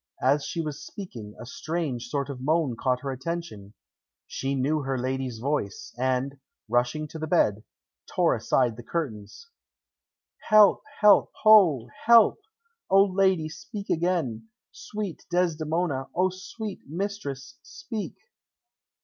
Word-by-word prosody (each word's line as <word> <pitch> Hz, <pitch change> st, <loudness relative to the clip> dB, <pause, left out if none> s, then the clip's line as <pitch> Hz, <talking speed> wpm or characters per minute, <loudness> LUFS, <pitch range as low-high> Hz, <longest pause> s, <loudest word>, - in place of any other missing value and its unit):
As 140 Hz, +3 st, +3 dB
she 170 Hz, -, -3 dB
was 150 Hz, -3 st, -5 dB
speaking, 115 Hz, -, -9 dB
a 120 Hz, -, -8 dB
strange 145 Hz, -3 st, -3 dB
sort 140 Hz, +2 st, -2 dB
of 130 Hz, -2 st, -8 dB
moan 150 Hz, -2 st, +1 dB
caught 125 Hz, +1 st, 0 dB
her 140 Hz, -, -3 dB
attention. 130 Hz, -8 st, -6 dB, 0.5 s
She 135 Hz, +1 st, -3 dB
knew 140 Hz, +4 st, +1 dB
her 135 Hz, -1 st, -2 dB
lady's 130 Hz, -1 st, -2 dB
voice, 150 Hz, -, -3 dB
and, 130 Hz, +2 st, -1 dB, 0.3 s
rushing 125 Hz, +7 st, 0 dB
to 160 Hz, -, -8 dB
the 155 Hz, -, -3 dB
bed, 105 Hz, -7 st, +2 dB, 0.4 s
tore -, -, +2 dB
aside 120 Hz, -4 st, +1 dB
the 120 Hz, -, -9 dB
curtains. 135 Hz, -, -5 dB, 1.0 s
"Help! 215 Hz, -2 st, +7 dB, 0.2 s
help, 210 Hz, -1 st, +6 dB
ho! 180 Hz, -, +6 dB, 0.2 s
Help! 230 Hz, -, +6 dB, 0.5 s
O 195 Hz, +1 st, +7 dB
lady, 190 Hz, -4 st, +2 dB
speak 200 Hz, +6 st, -7 dB
again! 165 Hz, -, -1 dB, 0.2 s
Sweet 205 Hz, -5 st, -6 dB
Desdemona! 165 Hz, -4 st, 0 dB
O 185 Hz, +1 st, +3 dB
sweet 200 Hz, +2 st, -7 dB
mistress, 155 Hz, -6 st, -5 dB
speak!" 225 Hz, -4 st, -6 dB
155 Hz, 125 wpm, -26 LUFS, 130-185 Hz, 1.0 s, Help